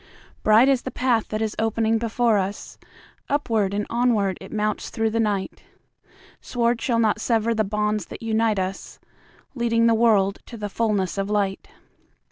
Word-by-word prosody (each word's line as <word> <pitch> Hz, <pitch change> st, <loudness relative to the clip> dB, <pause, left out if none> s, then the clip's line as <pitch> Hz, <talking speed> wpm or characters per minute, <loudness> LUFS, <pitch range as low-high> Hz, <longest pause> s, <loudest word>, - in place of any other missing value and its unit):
Bright 220 Hz, +4 st, +5 dB
is 270 Hz, -3 st, +3 dB
the -, -, -5 dB
path 250 Hz, -4 st, 0 dB
that 215 Hz, +1 st, -2 dB
is 215 Hz, -1 st, -3 dB
opening 225 Hz, 0 st, +1 dB
before 230 Hz, -1 st, +1 dB
us, 195 Hz, +2 st, -5 dB, 0.5 s
Upward 225 Hz, -9 st, 0 dB
and 205 Hz, +1 st, -2 dB
onward 225 Hz, -6 st, +1 dB
it 190 Hz, -, -10 dB
mounts 215 Hz, 0 st, -2 dB
through 225 Hz, 0 st, -1 dB
the 230 Hz, -, -1 dB
night:Sword 230 Hz, +3 st, -4 dB
shall 235 Hz, -3 st, 0 dB
not 220 Hz, -2 st, +1 dB
sever 230 Hz, -1 st, +1 dB
the 220 Hz, -1 st, +1 dB
bonds 210 Hz, -1 st, -1 dB
that -, -, -9 dB
unite 225 Hz, -1 st, +1 dB
usLeading 230 Hz, +5 st, -3 dB
the 230 Hz, -, +5 dB
world 210 Hz, -4 st, +3 dB
to 235 Hz, -, -9 dB
the 210 Hz, -1 st, -4 dB
fullness 200 Hz, -3 st, -1 dB
of 195 Hz, +1 st, -2 dB
light. 200 Hz, -2 st, -1 dB
220 Hz, 155 wpm, -23 LUFS, 205-230 Hz, 0.5 s, Bright